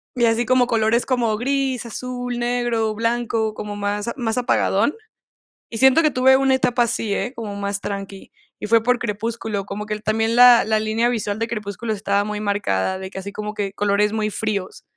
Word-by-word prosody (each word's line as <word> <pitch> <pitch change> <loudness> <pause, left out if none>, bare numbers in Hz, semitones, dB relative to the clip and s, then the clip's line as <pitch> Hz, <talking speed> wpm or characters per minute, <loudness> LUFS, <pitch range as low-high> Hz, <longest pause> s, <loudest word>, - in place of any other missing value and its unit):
y 240 - +2
así 230 +1 +2
como 255 0 +3
colores 230 0 +1
como 235 -5 0
gris, 265 -1 -1
azul, 245 +1 -5
negro, 240 -2 0
blanco, 230 -1 -1
como 210 -1 -6
más 205 +2 -2
a - - -3
más 235 -2 -1
apagadón. 240 0 +1 0.8
Y 225 - -6
siento 265 +4 +5
que 305 - +3
tuve 265 +1 +5
una 270 0 +2
etapa 245 -2 +2
así, 225 -3 -1
¿eh?, 245 - -2
como 210 -3 -6
más 200 0 -3
tranqui, 195 -1 -6 0.3
y - - -4
fue 225 0 +4
por 250 0 +2
Crepúsculo, 220 -2 -3
como 205 +1 -6
que 215 - -2
el 210 - -8
también 225 +1 +1
la 245 -1 +8
la 220 +1 +1
línea 220 +2 0
visual 215 -3 -2
de 230 - -1
Crepúsculo 215 0 -4
estaba 200 -1 0
muy 210 0 -4
marcada, 190 - -1
de 190 0 -7
que 190 - -8
así 200 +1 -7
como 210 +1 -5
que 200 -2 -3
colores 205 +1 +1
muy 215 -1 -1
fríos. 205 -2 -3
220 Hz, 200 wpm, -21 LUFS, 205-240 Hz, 0.8 s, la